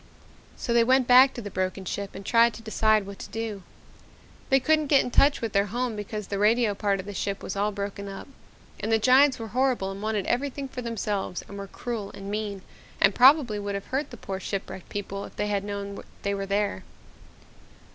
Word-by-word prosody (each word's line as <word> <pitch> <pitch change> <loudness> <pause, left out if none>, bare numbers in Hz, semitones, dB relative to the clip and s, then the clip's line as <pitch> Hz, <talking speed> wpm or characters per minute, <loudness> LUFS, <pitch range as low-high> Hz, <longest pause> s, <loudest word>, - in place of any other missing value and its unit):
"So 235 - -2
they 235 0 +5
went 255 +2 +4
back 255 +2 +7
to 240 - -6
the 205 - -6
broken 185 +1 -2
ship 200 +2 -4
and 195 +1 -8
tried 230 0 +4
to 225 - -11
decide 215 -1 +2
what 200 0 -9
to - - -8
do. 225 -3 -4 0.9
They 270 - +5
couldn't 310 +2 +2
get 280 -1 +5
in 250 - -5
touch 280 +3 +4
with 230 -3 -3
their 200 +1 +2
home 240 +2 -2
because 210 0 -5
the 200 0 -3
radio 220 +1 +3
part 200 -1 0
of 190 - -6
the 205 - -6
ship 195 +1 -3
was 190 - -4
all 205 +1 0
broken 200 0 -5
up. 195 0 -8 0.5
And 215 +2 -2
the 225 - +5
giants 260 +4 +5
were 225 -1 -6
horrible 245 -4 +1
and 195 +1 -8
wanted 215 -2 -1
everything 275 +2 -1
for 255 -1 -7
themselves 210 -5 -3
and 200 - -10
were 200 0 -6
cruel 220 0 -5
and 195 0 -7
mean 205 -2 -3 0.4
and 200 0 +5
probably 255 -3 +5
would 200 0 -3
have 200 - -5
hurt 270 +3 -2
the 245 - -10
poor 195 -2 -5
ship 195 +1 -4
wrecked 190 - -10
people 200 -1 -5
if - - -13
they 210 - -2
had 200 -1 0
known 200 -1 -5 0.2
they 200 - 0
were 195 0 -3
there. 200 +1 -1
210 Hz, 220 wpm, -26 LUFS, 200-240 Hz, 0.9 s, back